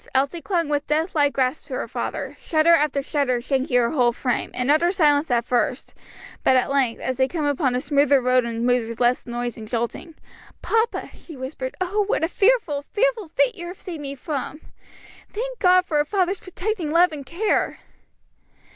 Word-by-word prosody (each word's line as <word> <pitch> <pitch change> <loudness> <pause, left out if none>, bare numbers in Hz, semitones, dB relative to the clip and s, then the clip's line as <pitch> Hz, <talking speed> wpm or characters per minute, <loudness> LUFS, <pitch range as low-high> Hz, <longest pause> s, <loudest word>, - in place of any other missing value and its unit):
Elsie 280 +6 +1
clung 340 -4 -1
with 290 -1 -1
death 315 +4 0
like 290 -2 +3
grasp 260 +2 -1
to - - -6
her - - -3
father, - - -4
shudder 320 +1 +3
after 295 -3 +2
shudder 270 -4 0
shaking 260 0 0
her 235 -1 +2
whole 245 -5 +3
frame, 245 +1 -2
in 250 +3 +1
utter 335 +4 +3
silence 300 -5 +3
at 235 -1 +1
first, 250 +1 -1 0.5
but 260 - +4
at 255 +1 +2
length, 265 -4 +1
as 260 -1 -3
they 260 0 +3
came 315 0 -3
upon 280 -3 +1
a - - +1
smoother 285 0 +3
road 255 0 +2
and 235 0 -3
moved 245 -2 +1
with 230 - -7
less 245 +1 +1
noise 240 -1 -4
and 220 -1 -8
jolting, 235 +8 -4 0.5
"Papa," 455 +1 0
she 320 -5 -12
whispered, 260 0 -5
"oh, 385 +3 0
what 415 - 0
a - - +3
fearful, 390 -7 +2
fearful 450 +4 -1
fate - - +1
you 345 -4 -8
have 360 +2 -9
saved 335 -5 -7
me 280 -1 -5
from! 295 +1 -5 0.7
Thank - - -5
God 365 -1 +5
for 305 -4 0
a - - +4
father's 380 +1 0
protecting 370 -2 -4
love 340 +3 +4
and 295 -2 -6
care!" 345 - -1
290 Hz, 195 wpm, -23 LUFS, 255-350 Hz, 0.7 s, God